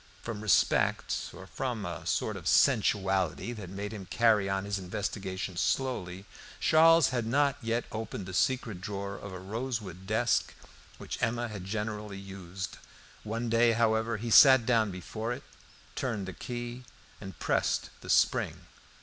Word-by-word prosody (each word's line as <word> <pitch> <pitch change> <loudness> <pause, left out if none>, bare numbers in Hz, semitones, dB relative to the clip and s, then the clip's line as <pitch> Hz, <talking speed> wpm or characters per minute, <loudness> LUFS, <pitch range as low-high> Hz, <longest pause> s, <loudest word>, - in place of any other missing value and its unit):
From 115 -3 -5
respect, 105 -2 +2
or 95 +2 -11
from 120 0 -3
a 85 -1 -6
sort - - 0
of - - -6
sensuality 95 +1 +2
that 105 -6 -8
made 100 +2 -5
him 100 -3 -8
carry 110 -4 +3
on 95 0 -1
his 100 -1 -2
investigations 95 -1 -4
slowly, 100 -8 -1 0.3
Charles 165 -1 +6
had 120 -3 -1
not 140 +3 +2
yet 115 0 -1
opened 110 -3 -5
the 95 - -8
secret 110 -4 0
drawer 100 0 -4
of 100 0 -8
a 95 - -6
rosewood 100 -2 -5
desk 115 +3 +1 0.4
which - - -6
Emma 120 +1 0
had 100 -4 -7
generally 105 0 -4
used. 95 -1 -7 0.4
One 115 +2 -3
day, 115 +1 +4
however, 110 0 +1
he 115 +2 -4
sat 130 -1 +8
down 115 -3 +3
before 110 +6 -4
it, - - -8 0.5
turned 115 -7 -2
the 95 - -5
key, 120 +2 -6 0.4
and 95 -3 -8
pressed - - 0
the - - -10
spring. - - +2
105 Hz, 150 wpm, -30 LUFS, 95-120 Hz, 0.5 s, sat